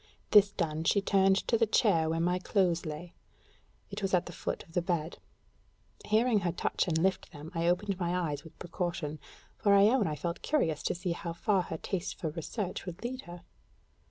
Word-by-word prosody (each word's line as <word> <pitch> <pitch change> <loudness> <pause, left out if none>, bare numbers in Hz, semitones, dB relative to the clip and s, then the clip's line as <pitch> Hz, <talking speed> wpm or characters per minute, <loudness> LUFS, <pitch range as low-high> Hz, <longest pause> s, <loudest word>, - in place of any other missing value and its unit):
This 205 -1 +7
done, 160 -5 -2
she 200 - +3
turned 195 -1 +3
to 230 - +2
the 225 - +3
chair 170 -7 +3
where 165 0 0
my 180 +2 +1
clothes 180 -4 +1
lay; 155 +3 -7 0.8
it - - -5
was 195 -1 +2
at 175 - +1
the - - -7
foot - - -4
of 165 - -20
the 175 - +1
bed. 170 -2 -2 0.9
Hearing 220 +1 +3
her 175 -3 -1
touch 175 - -1
and 160 -2 +1
lift 190 +3 0
them, 150 +2 -10
I 165 0 0
opened 190 +2 0
my 175 0 0
eyes 150 -5 -2
with 160 - -14
precaution, 170 -4 -4 0.4
for 200 -1 +4
I 200 - +7
own 245 -4 +2
I 155 - -2
felt 170 +4 -4
curious 160 - 0
to - - 0
see 175 0 -3
how 170 0 -4
far 195 +3 +1
her 165 -2 -5
taste 185 +2 -3
for 165 - -3
research 180 +5 -4
would 175 +3 -7
lead 255 +2 -4
her. 175 0 -9
175 Hz, 205 wpm, -30 LUFS, 165-200 Hz, 0.9 s, This